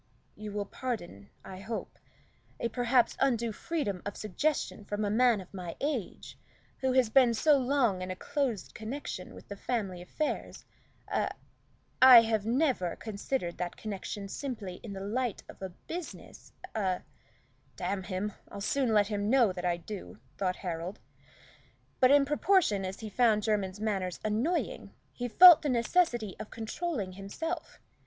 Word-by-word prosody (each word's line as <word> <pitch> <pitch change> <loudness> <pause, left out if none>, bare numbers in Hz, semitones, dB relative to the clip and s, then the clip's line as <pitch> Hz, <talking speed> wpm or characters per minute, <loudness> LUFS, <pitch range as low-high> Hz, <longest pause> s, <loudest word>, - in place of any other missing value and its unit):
"You 215 0 -7
will 205 0 -2
pardon, 180 - -5 0.2
I 185 - -8
hope, 220 +3 -6 0.6
a 235 - -1
perhaps 245 +1 +2
undue 235 -4 +2
freedom 210 - -3
of 205 - -5
suggestion 215 - -1
from 205 +1 -2
a 205 - 0
man 235 -1 +4
of 185 0 -12
my 180 -3 -6
age, 275 - -4 0.4
who 260 -1 +1
has 255 -4 +3
been 250 -3 +5
so 295 +3 +4
long 250 -7 +1
in 185 - -4
a 185 - -3
close 270 -3 -2
connection 230 -4 -6
with - - -13
the 200 - -6
family 200 -5 -3
affairs 300 - -4 0.4
a - - 0 0.7
I 255 -2 +11
have 220 -2 0
never 245 - +1
considered 210 -3 -3
that 175 -1 -3
connection 200 -1 -5
simply 205 -6 -5
in 205 -4 -7
a - - -5
light 230 +2 -2
of - - -12 0.3
business 345 -1 -8 0.2
a 190 -4 -1 0.3
" - - -37
"Damn 190 +2 -2
him, 190 +2 -3 0.2
I'll - - -8
soon 230 +3 +1
let 205 -1 +5
him 205 0 -2
know 240 -5 +5
that 180 0 -5
I 175 -1 +1
do," 170 - -8 0.2
thought 185 -2 -1
Harold. 170 +2 -4 1.0
But 255 - +6
in 285 0 +6
proportion 295 - +2
as 190 +3 -6
he 220 - -5
found 220 -2 +3
Jermyn's 205 -3 -1
manners 195 -4 -2
annoying, 305 - -1 0.2
he 245 - -3
felt 345 +8 +9
the 295 - -1
necessity 240 - +1
of 215 - -7
controlling 225 - -3
himself. 200 - -5
215 Hz, 155 wpm, -30 LUFS, 195-255 Hz, 1.0 s, I